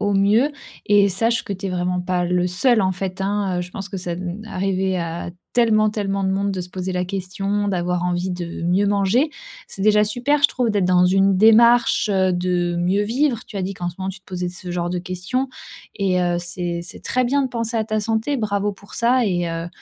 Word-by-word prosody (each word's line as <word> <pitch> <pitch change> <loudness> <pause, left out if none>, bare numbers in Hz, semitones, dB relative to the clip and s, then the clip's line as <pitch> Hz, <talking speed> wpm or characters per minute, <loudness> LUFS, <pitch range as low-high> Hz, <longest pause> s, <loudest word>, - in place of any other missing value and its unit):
au 205 -1 +1
mieux 215 +9 +3 0.3
et 205 -1 +5
sache 225 +5 +1
que 200 - -4
t'es 195 +1 -4
vraiment 180 0 -1
pas 180 0 -1
le 180 0 +1
seul 220 +6 +3
en 190 0 +1
fait, 185 +1 -5
hein, 195 -2 -1
heu. - - -1
Je 180 - -9
pense 195 +1 -6
que 195 - -6
ça, 175 -1 -4
mmh 180 +3 -5
arriver 190 -2 -1
à 170 0 -4 0.2
tellement 215 -3 +3
tellement 200 -2 -2
de 190 - +1
monde 200 +1 0
de 190 -2 -3
se 180 - -5
poser 185 0 -4
la 180 0 -1
question, 195 +2 -2
d'avoir 180 -2 -1
envie 180 +1 -1
de 175 -1 -5
mieux 180 +4 +2
manger. 205 +9 +2 0.4
C'est 195 - -6
déjà 210 0 +5
super 250 +7 0
je 290 - +7
trouve 245 -3 0
d'être 205 -3 +1
dans 180 0 +4
une 195 +1 +3
démarche, 235 +2 +5
heu, 190 -1 +2
de 175 -1 0
mieux 185 +4 +1
vivre. 245 +1 0
Tu 210 - -9
as 195 - -2
dit 190 +2 -2
qu'en 175 -1 -4
ce 175 - -7
moment 190 0 -3
tu 190 - -6
te - - -51
posais 180 -1 -4
ce 180 0 -7
genre 175 -1 -2
de 180 - -2
questions. 185 +9 -3 0.5
Et 190 -2 +1
heu, 175 -1 +1
c'est 175 0 -3
c'est 170 - -9
très 255 0 +1
bien 280 +3 +2
de 265 - -1
penser 230 -1 -3
à 220 - +1
ta 215 -1 -1
santé. 225 +6 -1
Bravo 205 -2 -1
pour 200 +1 -15
ça. 245 +1 +3
Et, 175 -3 0
heu, 165 0 -4
195 Hz, 235 wpm, -21 LUFS, 180-215 Hz, 0.5 s, je